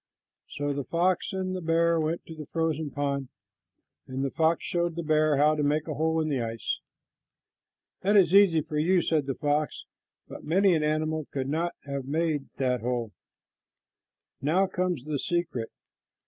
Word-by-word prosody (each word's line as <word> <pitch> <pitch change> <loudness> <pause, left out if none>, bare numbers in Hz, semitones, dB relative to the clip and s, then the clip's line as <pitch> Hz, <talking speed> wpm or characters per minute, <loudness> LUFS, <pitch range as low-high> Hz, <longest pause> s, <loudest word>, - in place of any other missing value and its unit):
So 145 0 -1
the 140 0 -3
fox 175 +6 0
and 185 -1 -2
the 185 - -4
bear 165 0 +2
went 160 +2 -2
to 165 - -9
the 155 -2 -9
frozen 160 -2 -1
pond, 140 -2 -2 0.8
and 135 +1 -2
the 135 - -2
fox 165 0 +1
showed 175 -1 -1
the 170 - -3
bear 155 -1 +3
how 150 +2 +5
to 150 - -1
make 150 +2 +1
a 155 - -2
hole 160 +2 +1
in 155 - 0
the 140 -5 0
ice. 115 -1 -3 1.2
"That 205 +2 +3
is 180 -3 +5
easy 195 -5 +6
for 150 0 -3
you," 175 +3 +3
said 155 -4 +1
the 135 - -1
fox, 150 +1 -1 0.4
"but - - -9
many 190 +4 +3
an 160 - +2
animal 155 0 -1
could 135 -1 -3
not 170 +3 -1
have 140 -2 -4
made 155 0 -1
that 125 -3 0
hole. 120 -2 -2 1.3
Now 165 +8 +3
comes 180 -6 -2
the 150 -2 -2
secret. 170 -10 -2
155 Hz, 175 wpm, -27 LUFS, 145-170 Hz, 1.3 s, easy